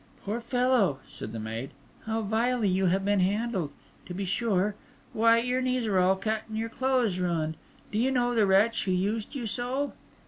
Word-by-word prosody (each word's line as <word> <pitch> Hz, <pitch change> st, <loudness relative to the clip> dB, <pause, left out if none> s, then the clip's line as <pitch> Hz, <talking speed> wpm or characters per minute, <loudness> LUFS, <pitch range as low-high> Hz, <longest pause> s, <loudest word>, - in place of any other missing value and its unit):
"Poor 215 Hz, +4 st, -2 dB
fellow," 245 Hz, -, +2 dB
said 110 Hz, -, -7 dB
the 115 Hz, -, -5 dB
maid, 115 Hz, +4 st, -4 dB, 0.4 s
"how 225 Hz, 0 st, -1 dB
vilely 225 Hz, +2 st, +1 dB
you 190 Hz, 0 st, +2 dB
have 190 Hz, +2 st, +1 dB
been 205 Hz, 0 st, +3 dB
handled, 195 Hz, -3 st, 0 dB, 0.4 s
to 180 Hz, -, -6 dB
be 195 Hz, +1 st, -2 dB
sure! 200 Hz, 0 st, +1 dB, 0.4 s
Why, 230 Hz, +1 st, +5 dB
your 250 Hz, +2 st, 0 dB
knees 255 Hz, -2 st, 0 dB
are 200 Hz, -4 st, +2 dB
all 185 Hz, +1 st, +4 dB
cut, 215 Hz, +2 st, -1 dB
and 220 Hz, -, -4 dB
your 225 Hz, +1 st, -2 dB
clothes 245 Hz, -6 st, +1 dB
ruined! 165 Hz, -3 st, -1 dB, 0.4 s
Do 215 Hz, -, 0 dB
you 250 Hz, +3 st, +3 dB
know 245 Hz, -2 st, +1 dB
the 220 Hz, -4 st, +3 dB
wretch 210 Hz, +4 st, +3 dB
who 190 Hz, -, 0 dB
used 205 Hz, +7 st, -1 dB
you 250 Hz, -4 st, -3 dB
so?" 255 Hz, +5 st, -2 dB
215 Hz, 195 wpm, -28 LUFS, 190-240 Hz, 0.4 s, Why